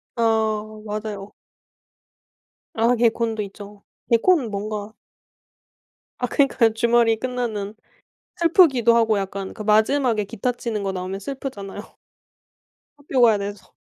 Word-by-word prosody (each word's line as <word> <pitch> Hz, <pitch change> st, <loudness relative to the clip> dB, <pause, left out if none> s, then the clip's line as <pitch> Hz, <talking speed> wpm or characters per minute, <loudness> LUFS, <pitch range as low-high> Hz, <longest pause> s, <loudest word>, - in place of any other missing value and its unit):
아 220 Hz, -2 st, +1 dB, 0.2 s
맞아요. 210 Hz, -1 st, -5 dB, 1.4 s
아 230 Hz, +2 st, +3 dB
개콘도 230 Hz, -1 st, +1 dB
있죠. 205 Hz, +1 st, -11 dB, 0.3 s
개콘은 245 Hz, +1 st, +3 dB
뭔가 210 Hz, +1 st, -4 dB, 1.3 s
아 250 Hz, -, 0 dB
그니까요 245 Hz, -4 st, +2 dB
주말이 235 Hz, 0 st, +3 dB
끝나는 220 Hz, -5 st, -3 dB, 0.6 s
슬프기도 285 Hz, -, +4 dB
하고 220 Hz, -3 st, +3 dB
약간 195 Hz, 0 st, -5 dB
그 -, -, -9 dB
마지막에 220 Hz, +2 st, +2 dB
기타 230 Hz, +4 st, -2 dB
치는거 215 Hz, -5 st, -3 dB
나오면 185 Hz, +1 st, -5 dB
슬프잖아요. 210 Hz, -5 st, -7 dB, 1.0 s
학교 275 Hz, -3 st, -1 dB
가야 225 Hz, -3 st, +6 dB
돼서. 200 Hz, -1 st, -7 dB
220 Hz, 250 characters per minute, -22 LUFS, 205-240 Hz, 1.4 s, 가야